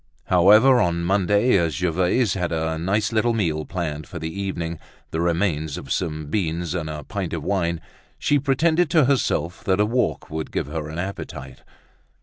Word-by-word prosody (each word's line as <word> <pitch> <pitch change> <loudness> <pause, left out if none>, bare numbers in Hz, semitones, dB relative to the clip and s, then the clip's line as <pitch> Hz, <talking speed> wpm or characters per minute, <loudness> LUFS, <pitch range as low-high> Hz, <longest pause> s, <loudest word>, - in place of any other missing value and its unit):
However, 105 +9 +6
on 85 -2 0
Monday, 100 +6 +3
as 85 -4 0
Gervaise 90 - +1
had 90 -3 -2
a 80 0 -1
nice 100 +6 0
little 115 +1 +2
meal 80 -8 -1
planned 80 -4 -4
for 90 - -8
the 80 0 -5
evening, 85 -4 -3 0.3
the 80 - -1
remains 80 -3 0
of 70 - -8
some 80 -4 -2
beans 85 0 -2
and 80 -3 -3
a 75 -1 -6
pint 95 -4 -4
of 80 -3 -3
wine, 85 -3 0 0.4
she 145 - +2
pretended 160 +5 +2
to 155 -5 +4
herself 90 - 0
that 95 0 +2
a 105 - +4
walk 120 -4 -1
would 80 0 -4
give - - -1
her 75 +1 -5
an 80 - -7
appetite. 70 -8 -6
85 Hz, 175 wpm, -23 LUFS, 80-105 Hz, 0.4 s, However